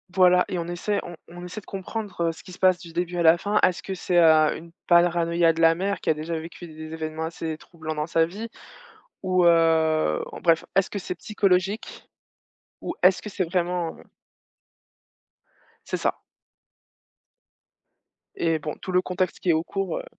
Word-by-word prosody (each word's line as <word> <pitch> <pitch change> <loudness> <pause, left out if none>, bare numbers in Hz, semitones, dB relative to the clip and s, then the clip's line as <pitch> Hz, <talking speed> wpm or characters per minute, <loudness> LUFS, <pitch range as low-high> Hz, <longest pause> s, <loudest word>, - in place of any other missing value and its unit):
Voilà 180 -1 +5
et 180 - -3
on 170 0 -3
essaie, 190 +4 -1
on 175 - -8
on 175 +1 -10
essaie 180 +4 -7
de 205 - -18
comprendre, 195 -2 -4
heu, - - 0
ce 165 - -13
qui 185 - -13
se - - -13
passe 185 -1 +4
du 170 -2 -12
début 175 +1 -2
à 170 - +1
la 165 +1 +7
fin. 205 +4 0
Est-ce 180 -1 +2
que 195 - -4
c'est, 180 -1 -1
heu, 155 -2 +5
une 165 +1 -11 0.2
paranoïa 170 -1 +4
de 165 - -6
la 165 0 +6
mère 195 +3 -2
qui - - -3
a - - +5
déjà 160 +2 -4
vécu 165 +2 -9
des 155 0 -9
événements 160 0 -4
assez 160 -1 -5
troublants 160 -1 -7
dans 150 +1 -2
sa 165 0 +3
vie 205 +7 -7 0.8
ou, 185 -1 +2
heu 160 - +3
en - - -8
bref, 165 0 +3
est-ce 195 0 +2
que 205 - -3
c'est 180 -1 -5
psychologique 195 +2 -1 0.7
ou - - -4
est-ce 185 +1 +5
que - - -8
c'est 190 -2 -2
vraiment, 175 -1 -2
heu - - -14 1.8
C'est - - -2
ça - - -1 2.2
et 165 -2 0
bon, 150 0 -5
tout 185 - -5
le 180 0 +3
contexte 185 -3 -2
qui 180 - -2
est - - +6
au 160 +1 +1
cours, 195 -1 -3
heu - - -8
175 Hz, 195 wpm, -25 LUFS, 165-185 Hz, 2.2 s, la